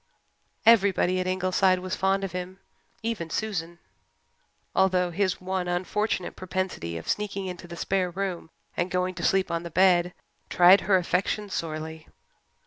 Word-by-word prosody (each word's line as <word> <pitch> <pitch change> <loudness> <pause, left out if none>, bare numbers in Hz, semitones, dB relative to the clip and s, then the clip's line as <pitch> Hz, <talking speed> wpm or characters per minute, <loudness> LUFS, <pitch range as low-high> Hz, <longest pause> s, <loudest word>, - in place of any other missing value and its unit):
Everybody 195 -5 +4
at 185 - -1
Ingleside 185 0 +2
was 185 +1 -4
fond 195 +1 +1
of 195 - -3
him, 180 +1 -6 0.5
even 220 -8 -3
Susan, 175 -3 -3 1.0
although 180 -2 +2
his 185 +1 0
one 185 0 -2
unfortunate 185 +2 -1
propensity 185 - -3
of 85 - -9
sneaking 200 -2 -2
into 180 -1 -7
the 170 0 -9
spare 190 0 0
room 180 -2 -4 0.3
and 175 - -1
going 180 0 -1
to 175 -1 -7
sleep 190 +1 +2
on 170 0 -1
the 170 - -7
bed 180 0 +3 0.3
tried 180 +2 +7
her 195 -1 +3
affection 190 +3 -1
sorely. 160 -1 -5
185 Hz, 145 wpm, -26 LUFS, 175-190 Hz, 1.0 s, tried